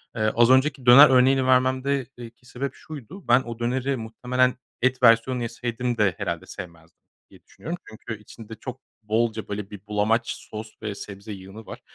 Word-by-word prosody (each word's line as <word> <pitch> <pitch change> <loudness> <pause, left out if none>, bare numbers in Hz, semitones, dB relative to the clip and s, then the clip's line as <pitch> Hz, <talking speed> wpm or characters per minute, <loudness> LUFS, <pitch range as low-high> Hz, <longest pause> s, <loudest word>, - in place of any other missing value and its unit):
Az 115 +2 +3
önceki 130 0 +2
döner 135 +5 +10
örneğini 130 0 +4
vermemde 130 +1 +2
eee, 120 -1 -8
ki 120 +1 -30
sebep 130 +2 -4
şuydu. 155 - -11
Ben 125 +2 +6
o 115 -2 -8
döneri 130 +3 -1
muhtemelen 125 +3 0 0.3
et 130 0 +1
versiyonunu 120 +2 +4
yeseydim 120 0 -3
de 95 -5 +2
herhâlde 85 -1 -4
sevmezdim, 85 -4 -11 0.3
diye - - -19
düşünüyorum. 170 +5 -7
Çünkü 110 0 -8
içinde 110 +1 -11
çok 130 +3 -8 0.2
bolca, 110 +1 -1
böyle, 100 -1 -5
bir 100 0 -11
bulamaç 110 +3 +1 0.2
sos 110 0 -7
ve 105 -2 -4
sebze 100 +1 -9
yığını 95 +3 -11
var. - - -9
120 Hz, 165 wpm, -24 LUFS, 110-130 Hz, 0.3 s, döner